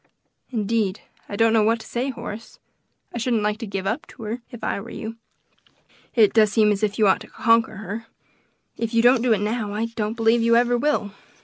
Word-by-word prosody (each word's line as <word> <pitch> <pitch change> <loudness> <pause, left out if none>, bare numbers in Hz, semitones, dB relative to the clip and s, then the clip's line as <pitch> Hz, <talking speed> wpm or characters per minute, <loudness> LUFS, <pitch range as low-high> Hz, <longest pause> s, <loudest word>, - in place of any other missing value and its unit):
"Indeed, 220 -3 -1 0.3
I 205 - -4
don't 225 +1 +3
know 225 - +4
what 225 +2 +2
to - - -12
say, 245 +4 -2
Horace; 225 -3 -8 0.6
I 235 - -3
shouldn't 230 -2 0
like 210 0 -1
to 225 - -5
give 195 -1 -4
up 245 - -2
to 230 - -12
her, 225 +3 -4
if 240 - -11
I - - -1
were 230 - -10
you; 225 +1 -7 1.0
it 220 -4 +5
does 215 -2 +4
seem 210 0 +4
as 200 0 -1
if 210 -2 0
you 215 -3 +4
ought 190 - +4
to - - -10
conquer 230 0 +2
her, 205 0 -6
and 225 +1 -5 0.8
if 230 0 -2
you 230 - +4
don't 245 0 +5
do 245 -1 +1
it 210 -3 +3
now, 210 -1 -2
I 220 +2 0
do 230 - -9
not 215 +2 -4
believe 230 0 +3
you 230 0 +4
ever 245 +1 +3
will." 240 -5 0
225 Hz, 230 wpm, -23 LUFS, 210-235 Hz, 1.0 s, it